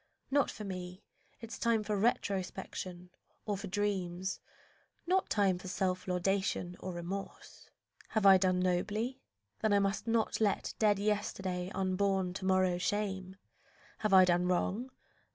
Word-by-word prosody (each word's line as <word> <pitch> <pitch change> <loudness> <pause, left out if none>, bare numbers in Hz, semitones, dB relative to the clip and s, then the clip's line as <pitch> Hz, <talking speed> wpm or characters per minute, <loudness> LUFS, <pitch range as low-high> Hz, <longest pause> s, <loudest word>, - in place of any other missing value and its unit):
Not 285 0 +3
for 215 - -7
me 185 0 -6 0.4
Is 230 0 -7
time 230 -2 +2
for 210 0 -1
retrospection 190 -3 -2 0.3
or 210 - -1
for 200 +1 -6
dreams, 190 -2 -2 0.7
Not 370 +2 +1
time 195 -4 +2
for 185 - -9
self 185 -1 -1
laudation 180 0 0
or 185 - -5
remorse. 175 +3 -7 0.4
Have 220 -2 0
I 195 -1 +9
done 185 -1 +2
nobly? 210 +8 -1 0.4
Then 215 -2 +2
I - - +5
must 200 +2 0
not 225 -1 +1
let 205 -2 +1
Dead 210 -2 +4
yesterday 195 -3 -1
unborn 190 -1 +1
to 190 0 -5
morrow 185 -2 +3
shame. 190 -2 -2 0.6
Have 215 - 0
I 190 -1 +8
done 180 0 +2
wrong? 195 +7 0
195 Hz, 140 wpm, -33 LUFS, 185-210 Hz, 0.7 s, I